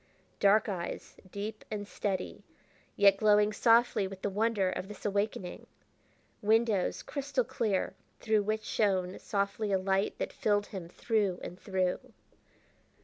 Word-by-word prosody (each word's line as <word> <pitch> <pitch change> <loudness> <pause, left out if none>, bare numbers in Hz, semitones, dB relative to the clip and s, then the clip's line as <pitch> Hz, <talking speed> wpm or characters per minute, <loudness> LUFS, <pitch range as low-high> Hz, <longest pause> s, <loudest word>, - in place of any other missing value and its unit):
Dark 205 +2 +4
eyes, 180 -4 -5
deep 210 +2 -5
and 205 -1 -4
steady, 195 -3 -3 0.5
yet 200 -1 +6
glowing 210 0 +4
softly 230 -3 +4
with 190 0 -10
the 205 - 0
wonder 205 -2 +1
of 185 - -4
this 210 -1 -11
awakening. 200 -3 -2 0.7
Windows, 220 -2 +2
crystal 280 -2 -1
clear, 210 -5 -1 0.3
through 215 -2 +2
which 215 +1 -1
shone 190 -4 0
softly 200 +1 -1
a 195 - +4
light 190 +1 0
that - - -3
filled 205 -1 +1
him 185 -5 -8
through 205 -2 0
and 180 - -7
through! 185 -2 0
205 Hz, 135 wpm, -31 LUFS, 190-215 Hz, 0.7 s, yet